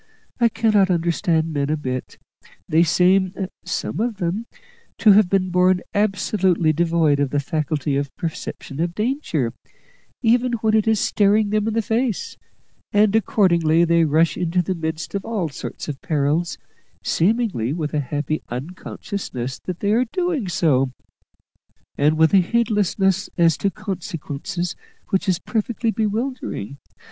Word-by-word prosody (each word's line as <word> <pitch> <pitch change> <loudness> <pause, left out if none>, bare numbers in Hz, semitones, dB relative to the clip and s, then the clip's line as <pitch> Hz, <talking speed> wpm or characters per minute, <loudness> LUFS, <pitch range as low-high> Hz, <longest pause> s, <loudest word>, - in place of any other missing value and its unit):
I 235 -1 +4
cannot 210 -3 +2
understand 165 -2 +1
men 140 -1 -1
a 155 - +1
bit. 130 -3 -5 0.5
They 160 +2 +3
seem 185 +3 +3 0.3
some 165 - -3
of 230 -1 -1
them 195 +5 -2 0.5
to 215 - +6
have 200 -2 +5
been 185 -1 +1
born 180 0 +3
absolutely 195 -5 +1
devoid 165 -3 +2
of 140 -1 +1
the 145 - 0
faculty 145 -1 -1
of 140 -1 -4
perception 155 -3 -6
of 170 +1 -1
danger, 210 - -1 0.7
even 240 +2 +3
when 220 -1 +1
it 220 0 +3
is 220 -2 +3
staring 205 0 +2
them 215 0 +1
in 225 - -1
the 225 - +1
face; 225 -1 -1 0.6
and 205 0 +3
accordingly 170 -6 +3
they 170 0 +3
rush 160 +2 +2
into 180 0 0
the 185 - -1
midst 160 -1 -4
of 200 - -2
all 205 -8 -2
sorts 135 - -7
of 145 -3 -5
perils, 155 +2 0 0.5
seemingly 190 - +1
with 155 -2 -3
a 150 - +1
happy 145 +2 -2
unconsciousness 130 -1 -5
that 180 -2 -5
they 205 - +1
are 240 +4 +3
doing 325 - -2
so, 140 -7 +2 1.1
and 150 +2 +2
with 160 +3 +4
a - - +8
heedlessness 200 -2 +1
as 165 -3 +4
to 200 - 0
consequences 180 -2 -5 0.3
which 190 +1 0
is 180 - +3
perfectly 225 +3 -1
bewildering. 215 - -3
180 Hz, 145 wpm, -21 LUFS, 155-210 Hz, 1.1 s, a